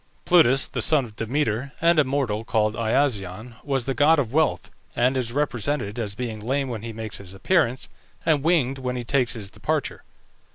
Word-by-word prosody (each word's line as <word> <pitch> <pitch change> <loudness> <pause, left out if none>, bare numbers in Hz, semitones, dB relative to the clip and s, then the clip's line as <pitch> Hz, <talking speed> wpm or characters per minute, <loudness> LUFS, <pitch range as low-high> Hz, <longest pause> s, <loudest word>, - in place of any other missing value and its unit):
Plutus, 135 -7 +5
the 125 - -4
son 140 +4 +4
of 110 -3 -13
Demeter 125 +2 -2
and 170 0 +4
a - - +6
mortal 130 -6 -1
called 110 -2 +1
Iasion, 110 -2 -1
was 135 -4 -1
the 135 - -1
god 155 +4 +4
of 130 -4 -1
wealth, 160 0 +1 0.2
and 125 +3 +2
is 125 -3 -1
represented 125 -4 -1
as 105 -3 -3
being 115 -2 -4
lame 135 +5 -1
when 115 -4 -5
he 115 +1 -6
makes 110 -1 -5
his 95 -1 -8
appearance, 130 - +1 0.4
and 155 -3 +3
winged 140 -5 +1
when 125 -1 -3
he 125 - -3
takes 125 0 +1
his 105 -4 -8
departure. - - -2
125 Hz, 190 wpm, -24 LUFS, 110-140 Hz, 0.4 s, a